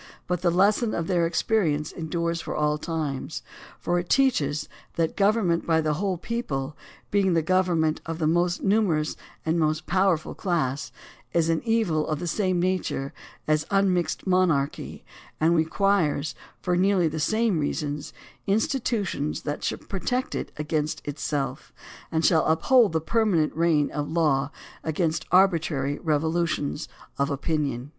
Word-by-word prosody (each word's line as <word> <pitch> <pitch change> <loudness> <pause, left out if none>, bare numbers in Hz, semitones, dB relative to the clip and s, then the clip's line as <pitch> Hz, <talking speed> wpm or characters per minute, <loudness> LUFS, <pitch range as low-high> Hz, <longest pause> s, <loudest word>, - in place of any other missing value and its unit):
But 180 -1 -2
the 180 - +3
lesson 205 +6 +2
of 170 - -1
their 170 -2 +2
experience 165 -5 0
endures 170 0 -2
for - - -5
all 150 0 +1
times, 155 -5 -3 0.4
for 175 +1 0
it 175 - -6
teaches 155 - +2 0.3
that 165 -1 0
government 200 -4 +2
by 160 -1 +3
the 155 -1 +1
whole 185 +3 -1
people, 155 - -3 0.4
being 195 -3 +3
the 165 - +2
government 175 -3 +1
of 165 -1 -3
the 160 - -1
most 175 +2 +1
numerous 195 -7 +2 0.3
and 160 +1 +1
most 155 0 0
powerful 185 -3 +1
class, 150 -7 -1 0.4
is 165 -1 +2
an 165 -1 +1
evil 215 -10 +1
of 155 - -1
the 175 - -5
same 185 +1 0
nature 175 -6 -1 0.3
as 155 0 +1
unmixed 195 -3 +1
monarchy, 180 -7 0 0.3
and 165 +2 +3
requires, 160 -3 +1 0.3
for 180 -1 +1
nearly 185 -1 +3
the 155 0 -3
same 215 +2 +1
reasons, 145 0 -3 0.4
institutions 205 - 0
that 145 0 -4
shall - - -1
protect 245 +6 -3
it - - -4
against 150 0 -2
it 145 0 -5
self, 140 -3 -3 0.4
and 160 0 +1
shall 160 -3 +4
uphold 215 +8 +4
the 160 - +2
permanent 185 -4 +1
reign 160 -3 +2
of 145 -1 -3
law 150 -4 +2 0.3
against 160 0 -1
arbi 185 -1 +5
trary 140 -2 -2
revolutions 160 -1 -1 0.3
of 140 +2 +2
opinion. 140 -3 -2
165 Hz, 150 wpm, -25 LUFS, 155-185 Hz, 0.4 s, arbi